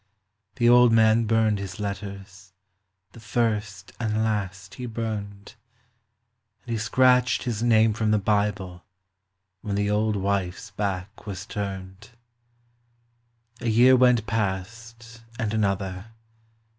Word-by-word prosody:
The 120 -3 +2
old 120 0 +6
man 110 0 +4
burned 110 -2 +2
his 100 0 -7
letters, 100 -2 -7 0.6
the - - -14
first 105 -3 -2
and 110 -1 -1
last 95 -3 -3
he 125 -1 -6
burned, 105 -3 -5 1.1
And 120 - -8
he 115 - -1
scratched 125 +2 +3
his 115 -3 -3
name 110 -2 +4
from 110 0 -1
the 105 - +3
Bible 100 -3 -1 0.8
when 100 -2 -3
the 100 0 0
old 105 +1 +1
wife's 100 +1 -2
back 100 +1 -4
was 95 -1 -6
turned. 100 -2 -6 1.5
A 120 - -2
year 125 +4 +6
went 125 -3 +4
past 115 +3 -4 0.2
and 110 -3 -2
another. 100 -2 -2
105 Hz, 120 wpm, -25 LUFS, 100-115 Hz, 1.5 s, old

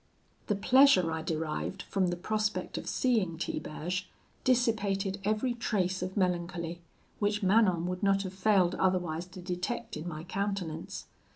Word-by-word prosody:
"The 210 - +1
pleasure 205 -5 +5
I 160 0 -2
derived 160 +4 -3
from 190 -2 0
the 175 - 0
prospect 215 +4 -1
of - - -6
seeing 215 -10 +1
Tiberge 175 +4 -3 0.3
dissipated 205 -6 +1
every 215 +5 +1
trace 190 -6 -1
of 185 +2 -4
melancholy, 175 -2 -1 0.4
which 205 0 0
Manon 190 -4 +4
would 180 0 -3
not 195 0 +3
have 190 -1 -5
failed 190 -2 +3
otherwise 180 -3 0
to 185 0 -10
detect 180 +6 -3
in 155 +3 -5
my 155 -2 -5
countenance. 195 -3 -3
185 Hz, 145 wpm, -30 LUFS, 175-210 Hz, 0.4 s, pleasure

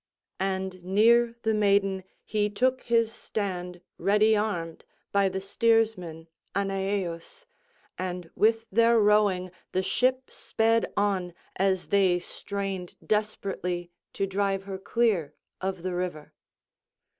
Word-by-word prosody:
And 190 -1 -2
near 230 +5 +4
the 220 - +2
maiden 200 -2 +2 0.2
he 210 -1 0
took 255 +5 +1
his 230 -1 +1
stand 180 -6 -4 0.2
ready 210 +2 +4
armed 175 -6 -2 0.3
by 200 -1 +3
the 190 - -3
steersman 195 -6 +1 0.3
Aneaeus, 195 - -2 0.5
and 180 -2 -4
with 225 +1 +2
their 230 +2 +5
rowing 205 -4 +3 0.2
the 185 - +1
ship 255 +5 +1
sped 225 +1 +1
on 190 -4 0 0.2
as 190 -1 0
they 195 -3 +4
strained 195 0 -5
desperately 190 -4 -2 0.2
to 195 - 0
drive 195 0 -1
her 195 -1 -6
clear 195 -9 0 0.3
of 190 -2 -3
the 185 -1 -2
river. 175 -4 -4
195 Hz, 115 wpm, -27 LUFS, 185-215 Hz, 0.5 s, their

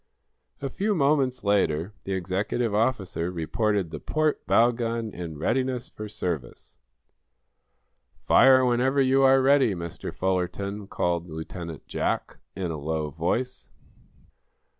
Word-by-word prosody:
A 135 - -1
few 205 +1 0
moments 140 -4 +2
later 100 -3 +1
the 95 - -2
executive 95 +5 -1
officer 105 -6 0
reported 90 +2 -1
the - - -5
port 155 -1 0
bow 115 +5 +5
gun 115 -2 -3
in 85 -3 -6
readiness 130 - -1
for 105 0 -8
service. 85 - -5 1.4
"Fire 130 0 +5
whenever 125 +3 +2
you 135 0 +4
are 135 0 +5
ready, 135 -6 +4
Mr. 85 -1 -6
Fullerton," 95 +2 -2
called 85 -2 -1
Lieutenant 80 0 -7
Jack, - - -2 0.2
in 90 -3 -3
a 80 - -4
low 75 0 -2
voice. 90 - -2
105 Hz, 120 wpm, -26 LUFS, 85-130 Hz, 1.4 s, bow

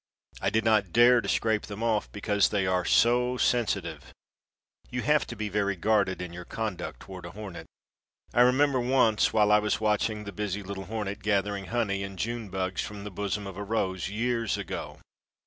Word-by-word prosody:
I - - +2
did 110 +2 0
not 105 -5 +3
dare 120 +2 +6
to 100 - -4
scrape 110 -1 +1
them 105 +2 -6
off, 110 -2 0
because 105 0 +1
they 100 -2 0
are 90 -1 +1
so 125 +4 +3
sensitive. 120 -2 0 0.8
You 125 0 -3
have 150 0 +2
to 120 - -6
be 110 -1 -3
very 100 0 0
guarded 100 -1 +1
in 90 -1 -7
your 90 0 -7
conduct 105 - -5
toward 95 -1 -9
a 85 - -7
hornet. 100 -5 -8 0.7
I 120 - +4
remember 130 +2 +4
once 120 -3 +3
while 105 -1 +3
I 105 - +6
was 105 0 0
watching 105 0 0
the 100 - -7
busy 105 0 -3
little 95 0 -6
hornet 105 -1 -4
gathering 100 -1 0
honey 105 -4 -1
and 100 -1 -6
June 115 +1 -3
bugs 95 0 -2
from 105 -1 -6
the 105 - -6
bosom 100 +1 -3
of 95 -2 -7
a 100 - -4
rose, 95 -4 -1
years 115 +1 -1
ago. - - -6
105 Hz, 190 wpm, -28 LUFS, 100-115 Hz, 0.8 s, dare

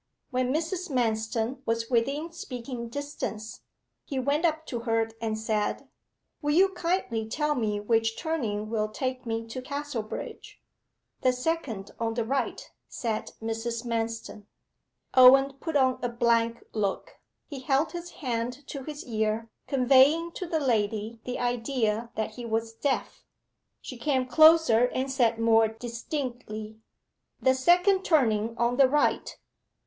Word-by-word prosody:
When 255 0 0
Mrs. 335 +4 -2
Manston 225 0 -1
was 230 +1 -1
within 275 +7 0
speaking 245 -6 -6
distance, 235 -5 -5 0.4
he 275 - -5
went 285 +5 +1
up 315 -1 0
to 240 - -4
her 225 -1 0
and 220 -1 -1
said 220 -1 -1 0.5
'Will 295 -1 +1
you 385 +3 +6
kindly 340 - -1
tell 300 +4 0
me 215 -5 -1
which 225 +1 +1
turning 225 -11 -2
will 215 -2 0
take 255 +2 -4
me 225 0 -2
to 230 +3 -6
Casterbridge?' 280 -5 -6 0.6
'The 255 -1 +3
second 250 -7 -3
on 225 -1 -1
the 230 -2 -1
right,' 270 +4 -2 0.2
said 225 -5 -3
Mrs. 230 +1 -3
Manston. 225 -2 -3 0.7
Owen 270 +2 +7
put 320 +1 -4
on 260 -2 +3
a 245 - -1
blank 235 -1 +1
look: 205 -3 -2 0.3
he 285 -3 -7
held 270 +4 +1
his 345 0 -6 0.2
hand 245 +3 -2
to 280 - -5
his 295 +2 -7
ear 220 -1 -1 0.2
conveying 275 +5 +4
to 365 - -6
the 325 -1 0
lady 220 -3 0
the 250 - -3
idea 235 -2 -1
that 220 0 -2
he 240 +3 -9
was 225 0 -1
deaf. 265 +4 -2 0.6
She 255 - -8
came 260 0 0
closer 310 -3 +6
and 260 +2 -2
said 240 -4 +2
more 225 -1 +4
distinctly 230 -1 -5 0.6
'The 260 - +4
second 355 +8 +4
turning 230 - +2
on 240 +1 +1
the 270 -2 +6
right. 295 +2 +1
245 Hz, 140 wpm, -27 LUFS, 225-280 Hz, 0.7 s, Owen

